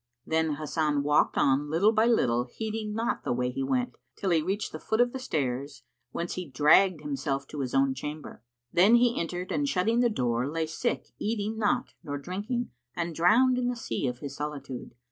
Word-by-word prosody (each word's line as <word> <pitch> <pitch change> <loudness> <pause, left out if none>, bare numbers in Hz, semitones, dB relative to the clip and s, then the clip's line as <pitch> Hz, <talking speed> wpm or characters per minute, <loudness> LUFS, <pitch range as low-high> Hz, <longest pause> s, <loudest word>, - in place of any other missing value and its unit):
Then 160 -1 +1
Hasan 150 -1 0
walked 150 +1 +2
on, 140 +2 +2
little 175 +8 +4
by 220 +1 +3
little, 125 - +2
heeding 215 - -4
not 230 +1 -1
the - - -2
way 125 +1 0
he 130 - -4
went, 125 -2 -1 0.2
till 190 - -1
he 165 -2 +4
reached 195 +6 -2
the - - -6
foot 220 - -1
of 245 0 +3
the 265 - -4
stairs, 140 - -3 0.3
whence 170 +6 -4
he 180 -2 -5
dragged 150 +5 +4
himself 140 -1 -2
to 150 - -6
his 130 -2 -2
own 135 0 +3
chamber; 150 -1 -7 0.3
then 195 +7 +6
he 240 0 +3
entered 175 +2 -4
and 285 -1 0
shutting 225 +3 +1
the 245 -1 +4
door, 125 - 0
lay 160 +1 -1
sick 200 +10 -2
eating 215 0 -2
not 245 +4 0
nor 145 -1 -4
drinking 205 - -3 0.2
and 170 -1 -2
drowned 240 +11 +4
in 245 - 0
the 245 - -1
sea 230 - -3
of 125 -1 -3
his 140 -1 -6
solitude. 140 -5 -6
160 Hz, 200 wpm, -28 LUFS, 140-220 Hz, 0.3 s, then